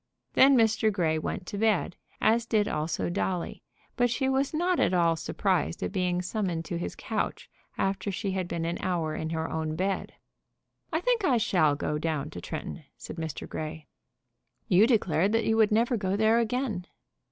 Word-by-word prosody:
Then 270 0 +6
Mr. 220 -1 +3
Grey 165 -5 +1
went 180 - -4
to 200 - -5
bed, 215 -5 +1 0.2
as 230 +2 +2
did 210 -3 +2
also 155 +2 -1
Dolly; 180 -1 -2 0.3
but 245 -1 +2
she 265 +3 0
was 265 +1 +1
not 350 +3 +1
at 185 - +3
all 170 -2 +3
surprised 180 +1 -1
at - - -2
being 180 -2 0
summoned 180 -4 -2
to 175 -3 -3
his - - -4
couch - - -3 0.3
after 195 +1 -1
she 195 +1 -2
had 185 -2 -2
been 170 -1 -3
an 170 +1 -2
hour 170 -4 -1
in 160 +1 -3
her 160 0 -2
own 160 -1 -2
bed. 190 +3 -2 0.8
"I 320 +1 0
think 480 0 +1
I 265 -9 +3
shall 175 -10 +3
go 150 +1 -2
down 155 -2 -2
to - - -7
Tretton," 160 +1 -6
said - - -9
Mr. 160 -3 -5
Grey. 155 0 -6 0.8
"You 205 +2 +5
declared 195 -5 +2
that 225 0 +2
you 220 - +2
would 220 -1 +4
never 235 +3 +2
go 190 -1 -1
there 220 +2 +4
again." 230 -5 -1
190 Hz, 185 wpm, -28 LUFS, 165-225 Hz, 0.8 s, Then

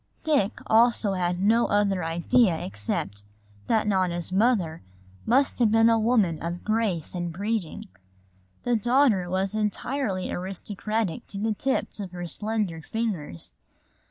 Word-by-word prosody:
Dick 275 -10 +1
also 225 -2 +3
had 180 -1 -1
no 225 +5 +3
other 200 -3 +1
idea 170 +4 +2
except 100 -2 -3 0.4
that 220 -1 +2
Nona's 185 -4 0
mother 190 -6 +1 0.5
must 270 +4 +2
have 235 -3 +4
been 225 +1 +5
a 225 - +3
woman 215 -8 +2
of 170 +1 -4
grace 215 -7 0
and 175 -1 -3
breeding. 200 -1 -3 0.8
The 245 -1 +1
daughter 230 -5 +3
was 190 +2 -1
entirely 215 -1 -2
aristocratic 195 +1 -3
to 200 - -8
the 215 +2 0
tips 260 -1 -2
of 190 -3 -6
her 175 -1 -5
slender 205 -1 -2
fingers. 155 - -4
200 Hz, 130 wpm, -26 LUFS, 175-225 Hz, 0.8 s, been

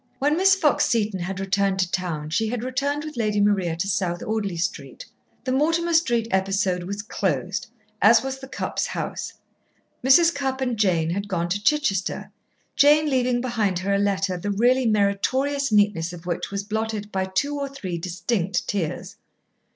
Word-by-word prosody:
When 290 +3 +2
Miss 385 +3 +5
Fox 315 -6 +2
Seton 215 -4 0
had 185 +2 -4
returned 195 0 0
to 185 -2 0
town 160 -5 -3
she 220 +7 +1
had 235 +1 -3
returned 280 +4 -2
with 305 -4 -8
Lady 210 -3 0
Maria 195 -5 +2
to 175 +4 -2
South 180 -3 -1
Audley 205 -5 -2
Street. 165 - -4 0.4
The 255 - -2
Mortimer 330 +5 +1
Street 240 -9 +2
episode 190 -1 +1
was 200 +2 -5
closed, 185 -2 -2 0.3
as 225 +3 +6
was 265 0 -4
the 265 - -9
Cupps' - - -3
house. - - -4 0.7
Mrs. 330 +6 +6
Cupp 270 -3 -2
and 250 -3 -1
Jane 175 -6 +1
had 200 +3 -3
gone 175 -3 -2
to 200 +3 -2
Chichester, 215 -10 0 0.4
Jane 295 +1 +5
leaving 250 -2 +1
behind 220 -7 0
her 195 +3 -1
a 200 - +2
letter 195 -2 0
the 190 +4 -4
really 245 +5 +3
meritorious 245 +7 +1
neatness 205 -5 +2
of 175 -1 -10
which 175 -2 -3
was 200 0 -3
blotted 215 0 -3
by 190 -1 -1
two 285 +10 -1
or 280 -1 -3
three 190 -11 -5
distinct 180 +2 -2
tears. 175 -7 -3
205 Hz, 175 wpm, -24 LUFS, 190-260 Hz, 0.7 s, as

